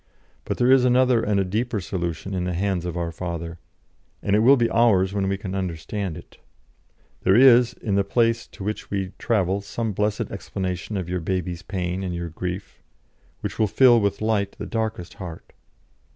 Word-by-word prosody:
But - - -2
there 125 +1 +4
is 130 -1 +6
another 125 -1 +4
and 105 -2 +1
a 95 - +1
deeper 110 +4 -1
solution 90 +1 -4
in 90 -1 -1
the 90 -1 -2
hands 95 -1 -1
of 90 -1 -4
our 85 -1 -2
Father; 85 -1 -5 0.6
and 100 - +2
it - - +4
will 130 +5 +6
be 120 -1 +3
ours 110 -5 +3
when 100 -1 0
we 100 - 0
can 95 -2 -6
understand 95 0 -3
it. - - -14 0.8
There 95 - +4
is 125 -1 +7
in 105 -3 -4
the 100 0 +3
place 115 +3 +1
to - - -10
which 105 +2 -4
we 95 -2 -2
travelsome 100 +1 -1
blessed 105 +2 -1
explanation 95 +2 -4
of 90 -3 -3
your 90 +1 -2
baby's 90 0 -2
pain 90 -1 -3
and 90 -2 -3
your 85 0 -4
grief, 90 +4 -6 0.6
which - - -5
will 110 - +4
fill 120 +2 +5
with 100 0 -1
light 105 -3 0
the - - -5
darkest 110 -6 -3
heart. 85 -3 -9
100 Hz, 185 wpm, -24 LUFS, 90-110 Hz, 0.8 s, is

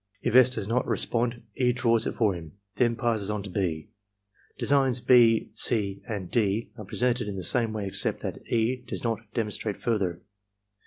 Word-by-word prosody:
If - - 0
S. 130 0 +7
does 110 -5 -2
not 120 +3 0
re - - 0
spond, 120 0 0
E. 125 -1 +3
draws 115 -2 +2
it - - -2
for 110 -5 +2
him, 80 -3 -9 0.2
then 120 0 +2
passes 115 -4 0
on 105 -1 -2
to 100 - -7
(6). 80 -6 -2 0.7
Designs 135 -3 +2
(6), 115 -3 +5
(c), 100 -5 0
and 100 -6 -5
(d) 110 -1 0
are 110 -4 -9
presented 120 +2 0
in 100 - -4
the 95 - -5
same 115 +5 +1
way 105 -2 -3
except 95 - -2
that - - -5
E. 120 +2 +1
does - - -4
not 115 -2 0 0.2
demonstrate 105 -2 -2
further. 95 -7 -1
115 Hz, 190 wpm, -27 LUFS, 100-120 Hz, 0.7 s, S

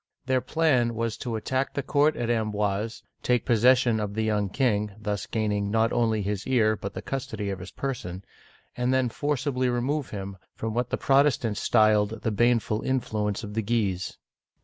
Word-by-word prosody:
Their 130 -1 +2
plan 130 -8 +2
was 115 -1 -1
to 120 -2 -4
attack 130 +5 -2
the 140 - -1
court 145 +3 +3
at 120 - -2
Amboise, 105 -1 -1 0.2
take 125 -2 +1
possession 120 0 +4
of 105 -1 -3
the 110 - 0
young 105 -2 0
king, 105 -3 +1
— - - -16
thus 105 -2 -3
gaining 105 -2 -1
not 115 +2 +2
only 110 -3 +1
his 100 0 -3
ear 110 -4 +3
but 100 -1 -7
the - - -5
custody 110 -7 -3
of 95 - -5
his 90 +1 -8
person, 100 -9 -5 0.2
— - - -32
and 125 +1 0
then 130 -2 +2
forcibly 130 -1 -1
remove 130 +4 -1
him 100 -1 -6 0.2
from 110 0 -3
what 120 +1 -1
the - - -1
Protestants 135 -5 +2
styled 110 0 +3
the 110 - 0
baneful 115 -1 +2
influence 105 -6 -1
of 105 -1 -6
the 110 - 0
Guises. 100 -4 -1
115 Hz, 185 wpm, -26 LUFS, 105-125 Hz, 0.2 s, possession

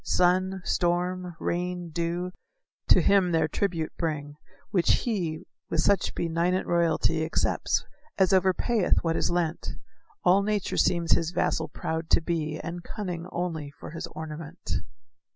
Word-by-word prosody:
Sun, 185 +1 +2
storm, 180 0 0
rain, 180 -1 -2
dew, 170 +2 -2 0.6
to - - +7
him 195 -3 +4
their 160 -1 +3
tribute 165 -1 -1
bring, 150 -3 -2 0.4
Which 180 -4 +3
he, 175 -9 -2 0.3
with 165 - +1
such 200 -1 +2
benignant 170 +3 0
royalty 165 -1 +2
Accepts, 160 - 0 0.3
as 190 -2 +4
overpayeth 190 +2 +2
what 165 -1 +1
is - - +1
lent; 170 -1 -1 0.5
All 190 +3 +5
nature 205 -1 -1
seems 170 -1 +2
his 165 - +3
vassal 160 -2 0
proud 160 0 -4
to - - +6
be, 160 -2 -2
And 175 +1 -6
cunning 180 -4 -5
only 160 -5 -3
for - - -8
his 165 - -5
ornament. 160 +1 -5
175 Hz, 135 wpm, -27 LUFS, 160-180 Hz, 0.6 s, to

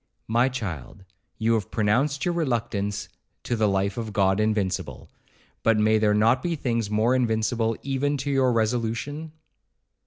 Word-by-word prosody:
'My 120 +4 +3
child, 100 - -6 0.3
you 115 +1 +2
have 110 -4 -1
pronounced 125 +7 +1
your 175 - +1
reluctance 110 -9 -2 0.4
to 120 - -1
the 110 -2 +2
life 100 +1 0
of 110 -3 -4
God 95 0 +2
invincible, 105 -3 -2 0.5
but 115 -1 +3
may 110 +1 +3
there 105 -1 +3
not 115 +4 +3
be 170 -1 -1
things 115 -7 -1
more 110 +4 +2
invincible 115 -2 0
even 140 +1 0
to 140 +1 -3
your 135 -2 +3
resolution? 120 +7 -1
115 Hz, 150 wpm, -25 LUFS, 105-130 Hz, 0.5 s, My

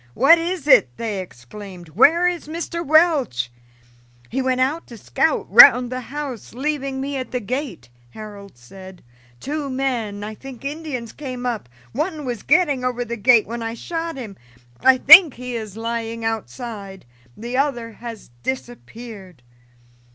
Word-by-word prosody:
"What 325 +7 +6
is 345 -1 -4
it?" 130 - +5
they 215 -4 -3
exclaimed. 180 - -11
"Where 295 - +4
is 350 -4 -3
Mr. 335 +1 -5
Welch?" 290 - +2 0.8
"He 265 - -2
went 255 -1 0
out 285 +6 -1
to 235 - -11
scout - - 0
round 250 - +8
the 255 - -3
house, 270 -4 -7
leaving 275 0 -3
me 275 +1 -3
at 255 - -5
the 250 - -2
gate," 240 - -5 0.2
Harold 200 - -11
said. 185 +9 -13 0.4
"Two 290 0 -4
men, 240 -6 -3
I 215 +1 -6
think 265 +3 -11
Indians, 280 -6 -5
came 255 -4 -7
up; 230 - -3 0.2
one 305 +2 -3
was 240 -3 -4
getting 290 -4 +2
over 245 -1 -2
the 235 0 -4
gate 235 0 +4
when 235 +2 -6
I 225 0 -4
shot 330 +4 -5
him. 220 -7 -8 0.4
I 260 0 +5
think 315 +3 +8
he 250 0 -6
is 215 -3 -6
lying 230 0 -4
outside 220 - -6 0.3
the 240 +3 -6
other 255 -4 -1
has 230 - -10
disappeared." 225 - -8
245 Hz, 150 wpm, -21 LUFS, 215-280 Hz, 0.8 s, round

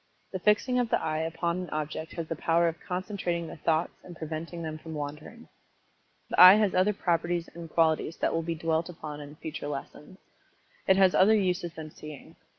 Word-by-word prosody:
The 185 - -4
fixing 220 +6 +2
of 245 -2 0
the - - +2
eye 155 -1 -2
upon 165 +2 -2
an 180 - -7
object 155 +1 -4
has 165 -2 -5
the 165 - -3
power 170 +2 +2
of 165 0 -3
concentrating 180 -2 -2
the 165 - -9
thoughts 160 +1 0
and 175 - -11
preventing 160 +2 -6
them 155 -1 -5
from 160 0 -8
wandering. 150 +10 -7 0.8
The - - +4
eye 185 +2 +12
has 210 -3 +2
other 185 +3 +3
properties 175 -3 -1
and 170 -1 -9
qualities 160 0 +1
that - - 0
will 165 - 0
be 165 0 -3
dwelt 165 +1 -1
upon 150 -3 -7
in 145 +1 -10
future 155 -1 -6
lessons. 150 +4 -7 0.7
It 190 -1 +5
has 190 -2 +5
other 210 +4 +5
uses 180 -4 -1
than 155 -1 -8
seeing. 150 +2 -11
165 Hz, 195 wpm, -28 LUFS, 155-180 Hz, 0.8 s, eye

